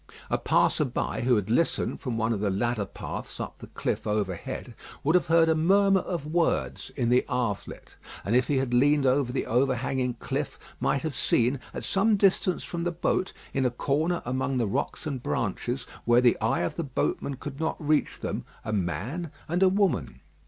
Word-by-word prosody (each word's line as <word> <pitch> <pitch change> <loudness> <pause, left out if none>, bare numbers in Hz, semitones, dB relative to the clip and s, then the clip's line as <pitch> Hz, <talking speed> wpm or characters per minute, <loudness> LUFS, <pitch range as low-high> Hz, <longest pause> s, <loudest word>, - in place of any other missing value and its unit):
A - - +3
passer - - +3
by, - - -2
who 125 0 +3
had 105 0 -1
listened 165 +8 +1
from 125 -4 -3
one 115 0 +1
of 105 - -2
the 105 0 0
ladder 105 +1 0
paths - - -7
up - - -6
the - - -10
cliffs - - -3
overhead, 105 -4 -3 0.3
would 155 - +3
have 180 -1 +3
heard 165 0 +5
a 160 - +4
murmur 195 +4 +4
of 175 -5 -4
words 165 +2 0
in 120 -4 0
the 125 +1 +4
Havelet, 120 -6 -3 0.3
and 110 - +1
if 125 0 +3
he 145 - +1
had 130 -2 -1
leaned 145 +3 +4
over 130 -1 +2
the 135 - -1
overhanging 125 0 0
cliff - - -3 0.2
might 140 - +1
have 160 -2 -2
seen, 125 +3 +2
at - - -6
some 210 +2 +3
distance 190 -2 +2
from 170 -1 -4
the 175 - 0
boat, 175 +2 0 0.2
in 135 - +1
a 125 - +3
corner 155 +8 0
among 130 +2 -1
the 120 - +2
rocks 100 - -2
and 140 -5 -3
branches, 120 +2 -2 0.2
where 120 +1 +5
the 125 -1 +5
eye 110 - +1
of - - -2
the 170 - -1
boatman 140 0 -2
could 135 +2 -8
not 160 0 -1
reach 155 -1 0
them, - - -3 0.2
a 110 - -2
man 105 - -2 0.2
and 175 +3 0
a 190 - +7
woman. 185 - 0
130 Hz, 195 wpm, -27 LUFS, 120-160 Hz, 0.3 s, a